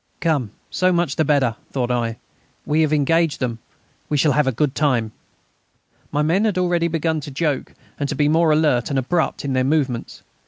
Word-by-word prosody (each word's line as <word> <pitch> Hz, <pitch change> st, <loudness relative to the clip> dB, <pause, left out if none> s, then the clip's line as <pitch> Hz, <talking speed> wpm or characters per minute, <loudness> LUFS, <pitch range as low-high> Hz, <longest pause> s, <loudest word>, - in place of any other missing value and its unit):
"Come, 150 Hz, -9 st, 0 dB, 0.2 s
so 185 Hz, 0 st, +2 dB
much 175 Hz, -5 st, 0 dB
the 160 Hz, -, +2 dB
better," 135 Hz, -6 st, +1 dB
thought 125 Hz, -2 st, -1 dB
I. 115 Hz, -2 st, -1 dB, 0.5 s
"We 155 Hz, +2 st, +2 dB
have 155 Hz, -1 st, +2 dB
engaged 155 Hz, +1 st, +2 dB
them. 120 Hz, -3 st, -2 dB, 0.5 s
We 150 Hz, -, +1 dB
shall 150 Hz, +1 st, +3 dB
have 150 Hz, -1 st, +2 dB
a -, -, +3 dB
good 135 Hz, +3 st, 0 dB
time." 125 Hz, -7 st, +1 dB, 1.0 s
My 150 Hz, +1 st, +1 dB
men 170 Hz, +7 st, +2 dB
had 205 Hz, -4 st, 0 dB
already 175 Hz, -2 st, +1 dB
begun 160 Hz, -1 st, -1 dB
to 145 Hz, -, -7 dB
joke 145 Hz, 0 st, -2 dB, 0.3 s
and 140 Hz, -1 st, -1 dB
to -, -, -2 dB
be 145 Hz, +1 st, +2 dB
more 160 Hz, +1 st, +3 dB
alert 150 Hz, -6 st, +2 dB
and 140 Hz, -, -1 dB
abrupt 160 Hz, +4 st, -1 dB
in 135 Hz, -, -1 dB
their 130 Hz, 0 st, +2 dB
movements. 135 Hz, -4 st, -1 dB
150 Hz, 195 wpm, -21 LUFS, 130-160 Hz, 1.0 s, shall